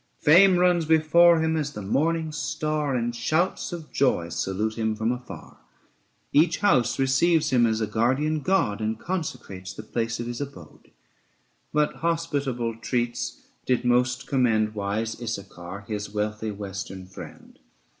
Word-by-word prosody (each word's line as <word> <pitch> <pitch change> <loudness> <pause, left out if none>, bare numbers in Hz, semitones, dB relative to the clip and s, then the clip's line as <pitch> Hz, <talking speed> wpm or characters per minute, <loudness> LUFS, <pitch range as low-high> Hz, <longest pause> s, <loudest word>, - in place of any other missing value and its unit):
Fame 180 +4 +6
runs 175 -2 +3
before 160 +2 +5
him 160 0 +1
as 145 -2 -2
the 105 - -6
morning 160 +9 0
star, 150 -2 -2
And 120 -1 -1
shouts 160 +13 0
of 165 -3 -7
joy 90 -11 +1
salute 95 +5 -2
him 110 -1 -1
from 110 +2 0
afar; 125 0 -8 0.8
Each 155 +4 +4
house 125 - +2
receives 145 +5 +2
him 120 -2 +4
as 110 0 0
a - - +2
guardian 130 +9 +1
god 145 - +1
735 110 - -1
And 110 - -3
consecrates 125 - -5
the 110 - -9
place 115 +1 -2
of 120 - -3
his 120 +2 -5
abode. 140 -1 -10 0.8
But 150 0 +1
hospitable 140 -9 -1
treats 120 - -2 0.2
did 125 -1 +1
most 125 +1 +2
commend 110 -5 +1
Wise 110 +3 -3
Issachar, 100 -4 -6
his 105 -2 -4
wealthy 105 +1 -2
western 95 -2 -6
friend. 95 - -12
120 Hz, 145 wpm, -25 LUFS, 110-155 Hz, 0.8 s, Fame